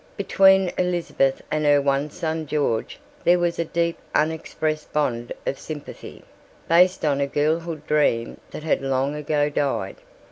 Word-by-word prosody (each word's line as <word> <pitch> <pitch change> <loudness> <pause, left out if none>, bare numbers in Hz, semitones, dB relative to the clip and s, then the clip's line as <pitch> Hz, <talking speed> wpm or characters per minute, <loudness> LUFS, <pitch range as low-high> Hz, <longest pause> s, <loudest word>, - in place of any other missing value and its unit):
Between 190 -1 +4
Elizabeth 175 -7 0
and 155 0 0
her 145 -1 +5
one 140 +1 0
son 160 -1 -3
George 140 -7 -1 0.3
there 175 +1 +5
was 175 -1 -1
a 170 - +1
deep 170 +1 -1 0.2
unexpressed 155 0 -1
bond 120 -6 -1
of 135 - -2
sympathy, 150 -2 -9 0.4
based 180 +1 +4
on 140 -2 +1
a 140 - +1
girlhood 155 +2 -1
dream 145 -7 +1
that - - -8
had 160 - +1
long 135 +1 0
ago 150 0 0
died. 145 -1 -2
150 Hz, 145 wpm, -23 LUFS, 140-165 Hz, 0.4 s, her